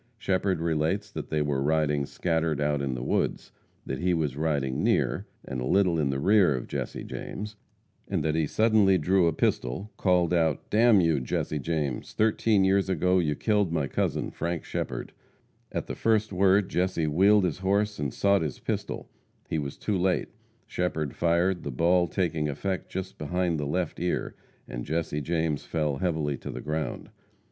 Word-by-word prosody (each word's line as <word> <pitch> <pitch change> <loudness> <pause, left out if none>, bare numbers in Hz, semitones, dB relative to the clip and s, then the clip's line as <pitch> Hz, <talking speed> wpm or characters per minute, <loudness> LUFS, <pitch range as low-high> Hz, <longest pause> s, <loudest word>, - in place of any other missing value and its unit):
Shepherd 95 -4 0
relates 85 +5 0
that - - -6
they 75 -1 +1
were 70 -2 -1
riding 75 -1 +1
scattered 80 -3 -1
out 75 -1 +1
in 70 -2 -2
the - - -4
woods; - - -1 0.3
that - - -4
he 90 0 +1
was 75 -5 -1
riding 70 -4 -1
near, - - +1 0.2
and 65 -1 -4
a 65 - -2
little 90 -2 +3
in 70 -3 +1
the 70 - -1
rear 95 -2 +4
of 60 - -4
Jesse - - -4
James; 105 +1 -6 0.5
that 75 +1 0
he 80 -1 +1
suddenly 110 -1 +4
drew 90 +2 +3
a - - +3
pistol, 75 - -1
called 90 -2 +2
out, 80 -4 0
"Damn 110 -2 +5
you, 80 -4 +2
Jesse 75 +4 -2
James! 75 -4 -2
thirteen 110 -2 +2
years 95 0 +2
ago 90 0 +2
you 75 -4 0
killed 105 -3 +1
my 80 -4 0
cousin, - - -1
Frank 85 -1 -3
Shepherd." - - -4 0.6
At - - -3
the - - -5
first 110 -2 +1
word 95 +1 +4
Jesse 90 -2 0
wheeled 95 +7 +4
his 90 -1 -1
horse 100 +2 0
and 70 -3 -1
sought 100 +5 +2
his 75 -4 -3
pistol. - - -4 0.4
He 80 - +1
was 70 -2 -5
too 100 -3 -1
late. 90 0 +1 0.4
Shepherd 80 -5 -2
fired, 85 +2 +2
the - - -5
ball 85 +6 +3
taking 80 -3 -1
effect 95 +7 -3
just 95 0 -5
behind 85 +1 -1
the 75 - -2
left 85 +2 -2
ear, 90 +1 -1 0.3
and - - -5
Jesse 80 -1 -2
James 80 -1 -1
fell 75 -4 -1
heavily 80 -5 -1
to - - -7
the - - -5
ground. 75 0 -4
85 Hz, 175 wpm, -27 LUFS, 75-95 Hz, 0.6 s, Damn